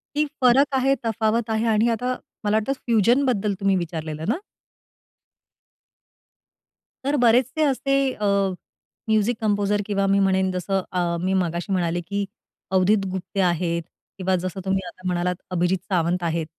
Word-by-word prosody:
की 300 +1 +2 0.2
फरक 270 +3 +4
आहे, 270 +1 +3
तफावत 225 +1 0
आहे 220 +1 0
आणि 220 +1 +3
आता 250 +2 -1 0.3
मला 210 0 +1
वाटतं, 220 +6 0
फ्युजनबद्दल 230 -1 +2
तुम्ही 195 -1 +2
विचारलेलं 160 -2 -4
ना? 260 - +1 2.7
तर 285 +2 +1
बरेचसे 250 +6 +3
असे 275 -1 +1 0.2
अ, 210 - -4 0.8
म्युझिक 220 +2 +2
कंपोझर 205 -1 +1
किंवा 200 -1 0
मी 200 0 +3
म्हणेन 190 -1 +2
जसं 190 +1 -1
अ, 175 -2 0
मी 190 +1 0
मगाशी 175 +1 -1
म्हणाले, 175 -1 0
की 200 +3 -3 0.5
अवधुत 195 +2 +3
गुप्ते 190 +1 -5
आहेत, 170 -1 +1 0.4
किंवा 190 -1 +1
जसं 185 +2 -3
तुम्ही 190 0 +1
आता 185 +1 -8
म्हणालात, 180 0 0 0.2
अभिजीत 180 +1 +1
सावंत 175 -1 +1
आहेत 165 -1 -1
195 Hz, 140 wpm, -23 LUFS, 180-225 Hz, 2.7 s, फरक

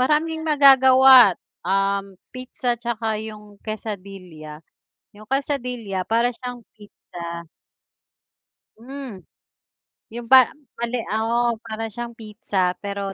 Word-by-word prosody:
maraming 310 +4 +1
magagawa, 265 - +7 0.3
um, 195 0 -1 0.2
pizza 255 -1 -3
'tsaka 225 -2 -3
yung 210 -2 -11
quesadilla. 190 -8 -8 0.6
Yung 215 - -13
quesadilla 250 -8 -3
para 230 +4 +1
siyang 245 +1 -7 0.2
pizza. 170 -5 -10 1.3
Hmm. 255 -4 -9 0.9
Yung 235 +1 -8
pa 260 -3 +8 0.3
mali, 235 +1 -2 0.2
oo 235 +2 0
para 225 -1 -6
siyang 235 0 -7
pizza 205 -4 -2
pero 200 -1 -5
225 Hz, 95 wpm, -22 LUFS, 200-250 Hz, 1.3 s, pa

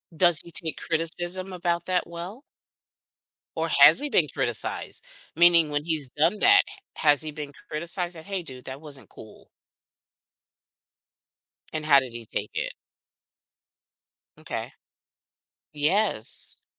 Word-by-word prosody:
Does 175 -2 +7
he 170 - -14
take 160 -2 -2
criticism 175 +3 -1
about 175 -1 -2
that 185 -1 0
well? 175 +9 -9 1.1
Or - - -2
has - - +8
he 295 +1 -3
been 160 - +2
criticized? 125 -5 0 0.3
Meaning 170 -1 +5
when 145 0 -2
he's 155 -6 -1
done 165 +10 0
that, 400 0 +6
h - - -11 0.3
has 145 -2 +5
he 155 -1 -3
been 150 -1 -8 0.2
criticized 175 +3 -1
like, 160 - -11
"Hey 195 -3 -4
dude, 130 -5 -11
that 130 +1 -8
wasn't 145 -3 -5
cool." 110 - -15 2.3
And 155 -1 -4
how 140 -3 +6
did 130 -3 -7
he 120 -1 -8
take - - -5
it? - - -4 1.6
M'kay. - - -7 1.0
Yes. 150 - +1
160 Hz, 130 wpm, -25 LUFS, 145-175 Hz, 2.3 s, has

